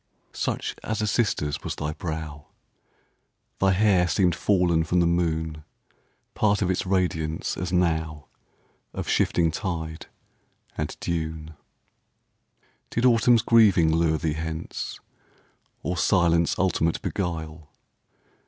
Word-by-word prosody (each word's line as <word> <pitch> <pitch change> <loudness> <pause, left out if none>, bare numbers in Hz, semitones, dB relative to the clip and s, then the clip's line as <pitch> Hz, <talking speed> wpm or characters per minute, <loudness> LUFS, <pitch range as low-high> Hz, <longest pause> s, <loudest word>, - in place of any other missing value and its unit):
Such - - -3
as 110 -1 -2
a - - +1
sister's 100 - 0
was - - -4
thy 75 +1 -3
brow; 80 -2 -6 1.1
Thy 95 0 +3
hair 95 -3 +3
seemed 90 +2 +2
fallen 90 -3 +2
from 90 +2 +1
the 85 - +3
moon—Part 85 +5 -2
of 95 - +1
its 95 - -2
radiance, 80 -4 -1
as 90 +1 -4
now, 80 -4 0 0.7
Of - - -4
shifting 85 -2 +2
tide 80 -2 -4 0.7
and 75 - -4
dune. 80 -2 -3 1.4
Did 120 - 0
Autumn's 115 -1 +4
grieving 100 -9 +5
lure 80 -1 +2
thee 80 -1 -1
hence. 80 0 -5 0.8
Or 90 - -2
silence 85 -2 +2
ultimate 85 -3 +1
beguile? 80 -4 -4
85 Hz, 110 wpm, -25 LUFS, 80-95 Hz, 1.4 s, grieving